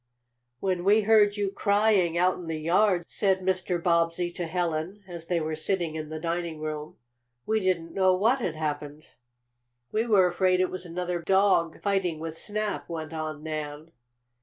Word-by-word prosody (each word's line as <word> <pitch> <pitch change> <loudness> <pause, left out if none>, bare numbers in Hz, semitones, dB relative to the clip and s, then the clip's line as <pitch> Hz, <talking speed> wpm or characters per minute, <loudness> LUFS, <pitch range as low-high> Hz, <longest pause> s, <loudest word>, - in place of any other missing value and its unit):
"When 185 -2 -1
we 205 +3 +5
heard 210 -1 +4
you 200 -1 -1
crying, 200 -5 +2
out 180 +1 +3
in 175 - -8
the 160 -1 -2
yard," 180 +3 +2
said 190 -2 +1
Mr. 185 -1 0
Bobbsey 170 0 +1
to 175 -1 -4
Helen, 175 +3 -2
as 170 -2 -8
they 175 -2 +1
were 155 0 -2
sitting 170 0 -1
in 155 -1 -5
the 155 0 -5
dining 170 -1 -3
room, 155 0 -5 0.5
"we 220 0 +1
didn't 175 -4 -1
know 185 -1 +3
what 230 +8 +2
had 175 -9 -2
happened." 150 -1 -4 0.8
"We 225 +2 0
were 200 -5 +5
afraid 185 +1 +2
it 185 - +1
was 185 -1 -6
another 175 +1 -3
dog 190 -3 +2
fighting 195 -5 0
with 160 0 -5
Snap," 210 +3 -3
went 160 -1 -5
on 155 -1 -5
Nan. 155 0 -5
175 Hz, 170 wpm, -27 LUFS, 160-195 Hz, 0.8 s, we